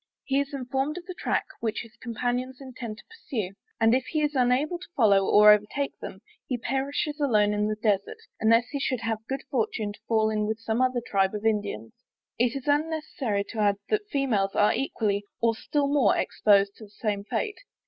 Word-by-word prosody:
He 275 0 +1
is 280 0 -2
informed 270 +3 -2
of 355 - -8
the 365 - -6
track - - -1
which 225 -1 -2
his 230 -1 -13
companions 245 +2 -3
intend 250 -5 -7
to - - -14
pursue, 240 - -5 0.3
and 225 0 +4
if 260 +1 +2
he 310 +1 -1
is 295 0 0
unable 265 +6 +2
to 365 - -11
follow, 200 -5 +4
or 210 0 +8
overtake 210 +7 +1
them, 190 - -8 0.3
he 250 - -1
perishes 275 +5 -2
alone 210 -7 +3
in 210 0 +1
the 215 - -1
Desart; 210 -2 0 0.2
unless 230 +2 +4
he 285 - -3
should 255 -3 -1
have 225 -1 -1
the 265 +5 -4
good - - -17
fortune 220 -4 -1
to - - -16
fall 220 -1 +2
in 210 -1 0
with 220 0 -1
some 225 +1 -1
other 255 -1 +2
Tribes 195 0 +1
of 210 +1 -5
Indians. 205 - -1 0.5
It 245 +2 +2
is 275 +1 -6
unnecessary 290 -8 0
to 225 - -6
add 205 -1 +3
that 430 - +3
the 415 - -31
females 225 - 0
are 205 - +4
equally, 210 -6 -1 0.2
or 230 -1 +3
still 285 +4 -1
more, 280 -8 +3
exposed 200 -1 +3
to 220 - -11
the - - -18
same 205 -1 -3
fate. 410 - -3
230 Hz, 210 wpm, -27 LUFS, 210-275 Hz, 0.5 s, or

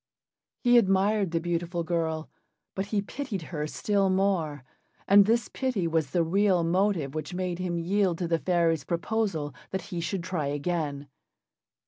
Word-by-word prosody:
He 245 -1 +7
admired 195 -1 +2
the 165 0 0
beautiful 175 0 -2
girl, 160 -2 -1 0.5
but 195 +1 -3
he 205 -1 0
pitied 215 - -5
her 150 -1 -2
still 200 +4 +1
more, 185 -7 0 0.4
and 200 0 +7
this 235 +1 +2
pity 250 -10 -1
was 160 -3 0
the 170 +3 +2
real 185 +1 +2
motive 175 -4 +1
which 155 +3 -5
made 180 -1 -2
him 180 -2 -2
yield 185 +1 +1
to 175 - -2
the 165 0 +1
fairy's 170 -3 +1
proposal 170 - -1 0.2
that 190 - -3
he 175 - -2
should 185 +1 -2
try 175 -5 -2
again. 145 -1 -2
175 Hz, 155 wpm, -27 LUFS, 165-195 Hz, 0.5 s, He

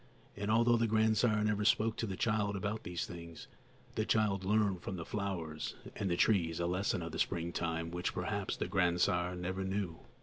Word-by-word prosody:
And 100 +1 -3
although 115 +2 +5
the 115 0 +2
grandsire 110 0 +3
never 105 -1 +1
spoke 110 +1 +3
to 115 - -1
the 95 -2 -4
child 105 -3 +1
about 100 +3 -2
these 90 -1 -3
things, 85 -1 -9 0.5
the 110 - 0
child 105 -3 +2
learned 100 -2 +2
from 95 - -4
the 85 -2 -5
flowers 90 -7 -3 0.2
and 95 -4 -1
trees 85 -7 +3
a 85 - 0
lesson 90 0 0
of 85 - -5
the 80 - -5
springtime 85 -1 -1
which 90 +1 -2
perhaps 95 +2 -2
the - - -2
grandsire 90 -1 +2
never 95 +2 -3
knew. 95 -3 -2
95 Hz, 180 wpm, -34 LUFS, 85-105 Hz, 0.5 s, although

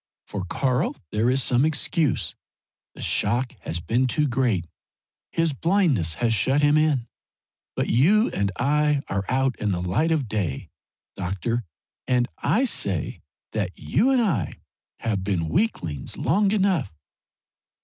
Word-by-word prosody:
For 100 -3 -5
Karl 125 +6 0 0.2
there 110 +3 +1
is 130 +1 +2
some 125 +1 +3
excuse; 150 - +1 0.6
the - - -7
shock 120 +4 +1
has 85 - -3
been 120 +9 +1
too 150 +4 +1
great 120 -9 +1 0.7
his 165 -2 +1
blindness 145 - +1
has 120 -2 +1
shut 135 +6 +2
him 145 0 +5
in. 150 -6 +2 0.7
But - - 0
you 190 - +4
and 100 0 0
I 145 +4 +2
are 95 0 -1
out 130 0 +1
in 105 -1 0
the 90 - -1
light 90 - 0
of 155 -6 +1
day, 95 -11 -3 0.4
doctor, 100 +6 -2 0.4
and 125 -1 +2
I 250 +6 +2
say 100 - -1 0.3
that 100 -4 -3
you 230 +9 +1
and 260 -3 +3
I 125 - 0 0.5
have 105 -4 -1
been 90 -5 -1
weaklings 85 - -1
long 195 - +2
enough." 190 - +1
125 Hz, 140 wpm, -24 LUFS, 100-150 Hz, 0.7 s, him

